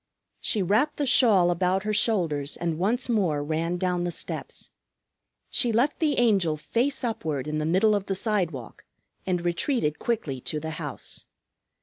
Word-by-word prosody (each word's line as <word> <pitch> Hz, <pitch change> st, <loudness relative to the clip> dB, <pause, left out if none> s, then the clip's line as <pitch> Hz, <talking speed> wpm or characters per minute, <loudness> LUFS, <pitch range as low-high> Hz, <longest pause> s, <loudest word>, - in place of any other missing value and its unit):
She 210 Hz, -, +1 dB
wrapped 225 Hz, -, +1 dB
the 290 Hz, -, 0 dB
shawl 205 Hz, -9 st, +5 dB
about 185 Hz, +2 st, 0 dB
her 215 Hz, 0 st, -1 dB
shoulders 170 Hz, -10 st, +1 dB
and 165 Hz, -2 st, -2 dB
once 230 Hz, +7 st, 0 dB
more 180 Hz, -11 st, +1 dB
ran 165 Hz, +3 st, -1 dB
down 180 Hz, -1 st, -1 dB
the 175 Hz, -, -1 dB
steps. 170 Hz, -, -5 dB, 0.8 s
She 240 Hz, -, +4 dB
left 245 Hz, +7 st, +1 dB
the 300 Hz, -3 st, +1 dB
Angel 195 Hz, -10 st, +2 dB
face 260 Hz, -, -1 dB
upward 155 Hz, -, -2 dB
in 155 Hz, 0 st, -2 dB
the 155 Hz, -, -1 dB
middle 195 Hz, +6 st, +3 dB
of 200 Hz, -1 st, -1 dB
the 195 Hz, -, -1 dB
sidewalk, 180 Hz, -, -2 dB, 0.4 s
and 180 Hz, -2 st, -1 dB
retreated 175 Hz, -, 0 dB
quickly 155 Hz, -, -2 dB
to 150 Hz, -, -3 dB
the 160 Hz, +1 st, -5 dB
house. 150 Hz, -4 st, -6 dB
185 Hz, 160 wpm, -26 LUFS, 160-225 Hz, 0.8 s, shawl